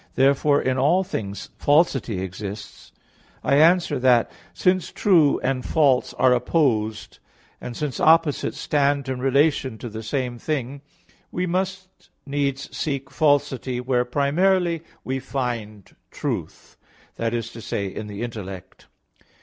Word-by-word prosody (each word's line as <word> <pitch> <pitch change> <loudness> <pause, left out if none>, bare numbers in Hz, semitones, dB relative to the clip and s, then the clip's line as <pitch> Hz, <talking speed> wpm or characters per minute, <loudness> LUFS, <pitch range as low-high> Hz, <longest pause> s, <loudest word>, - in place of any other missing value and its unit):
Therefore 140 +2 +3
in 130 0 0
all 165 +8 +3
things 100 - -5
falsity 140 - +2
exists. 95 +2 -7 0.5
I 140 - +3
answer 165 -2 +4
that, 125 -2 +3 0.2
Since 185 -1 +1
true 165 -8 +3
and 130 -1 -1
false 140 -5 +2
are 130 -1 +4
opposed, 120 -5 0 0.4
and 120 - -7
since 150 -5 -3
opposites 160 -2 +3
stand 140 -1 +1
in 130 -1 -3
relation 135 -2 +2
to 120 - -7
the 110 +1 -7
same 120 +1 -3
thing, 140 -2 -3 0.5
we 180 - -1
must 185 +1 -4 0.2
needs 140 -1 -2
seek 135 -3 -3
falsity, 135 -4 +1
where 125 0 +1
primarily 165 +6 +1 0.2
we 130 +1 -2
find 120 -6 -5
truth; - - -5 0.4
that 115 0 -1
is 115 -2 -4
to 115 - -10
say, 105 -2 -3
in 105 +2 -6
the 105 +2 -6
intellect. 95 -6 -8
135 Hz, 130 wpm, -23 LUFS, 120-150 Hz, 0.5 s, answer